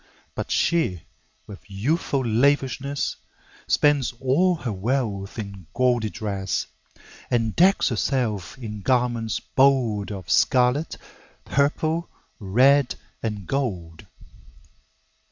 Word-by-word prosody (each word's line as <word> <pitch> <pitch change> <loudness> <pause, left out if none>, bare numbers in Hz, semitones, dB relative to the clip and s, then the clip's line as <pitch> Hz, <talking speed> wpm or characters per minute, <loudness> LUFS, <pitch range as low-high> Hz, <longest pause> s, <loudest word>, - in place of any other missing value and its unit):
But - - -5
she, 155 - +1 0.4
with 100 - -10
youthful 135 - -1
lavishness, 140 +3 +1 0.5
Spends 145 -5 +2
all 140 +9 +2
her 125 -9 -4
wealth 105 -1 -2
in 100 -5 -7
gaudy 120 -4 +2
dress, 100 -3 -3 0.6
And 115 -3 0
decks 190 0 +4
herself 115 -6 -1
in 105 -5 -7
garments 120 -2 0
bold 110 -1 +2
Of 95 -3 -7
scarlet, 130 +4 +2 0.5
purple, 155 +4 0 0.3
red, 125 +7 +3 0.3
and 105 -4 -4
gold. 90 - -3
120 Hz, 95 wpm, -24 LUFS, 105-140 Hz, 0.6 s, decks